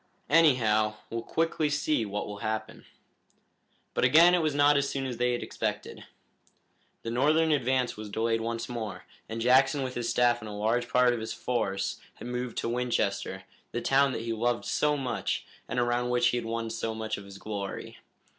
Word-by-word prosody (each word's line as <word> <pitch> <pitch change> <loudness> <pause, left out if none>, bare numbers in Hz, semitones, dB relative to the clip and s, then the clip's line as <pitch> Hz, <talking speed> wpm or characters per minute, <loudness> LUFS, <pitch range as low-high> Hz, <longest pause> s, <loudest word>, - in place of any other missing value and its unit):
Anyhow, 115 -9 +4 0.2
we'll 115 0 -2
quickly 160 +3 0
see 145 -5 0
what 105 +1 -3
will 105 -1 -7
happen." 110 +1 -4 1.1
But - - 0
again 160 +8 +7
it 180 - +3
was 155 -3 0
not 145 0 +5
as 140 -1 +1
soon 135 -1 -3
as 125 -3 -4
they 125 0 +1
had 120 - -2
had - - -4
expected. - - -4 1.0
The 115 - -3
Northern 155 +6 +3
advance 130 -4 +1
was 105 -1 -7
delayed 115 +2 0
once 115 0 -3
more, 110 -5 -5 0.3
and 115 - -4
Jackson 135 +3 +4
with 130 -1 -4
his 120 -1 -2
staff 120 -1 +3
and 110 - -7
a - - -6
large 115 +4 0
part 125 -1 +4
of 120 - -3
his 110 - -4
force 95 -6 -2 0.2
moved 125 -1 -4
to - - -1
Winchester, 115 -6 -1 0.3
the 120 - -1
town 135 +2 +3
that 115 - -4
he 115 0 -2
loved 120 +2 0
so 150 0 +1
much, 125 -4 -2 0.2
and 125 - -2
around 120 0 +1
which 120 0 +3
he 120 - 0
had 115 -2 -4
won 115 0 -3
so 110 0 -3
much 110 -1 -3
of 100 - -11
his 100 0 -11
glory. 100 -1 -6
120 Hz, 195 wpm, -28 LUFS, 110-130 Hz, 1.1 s, again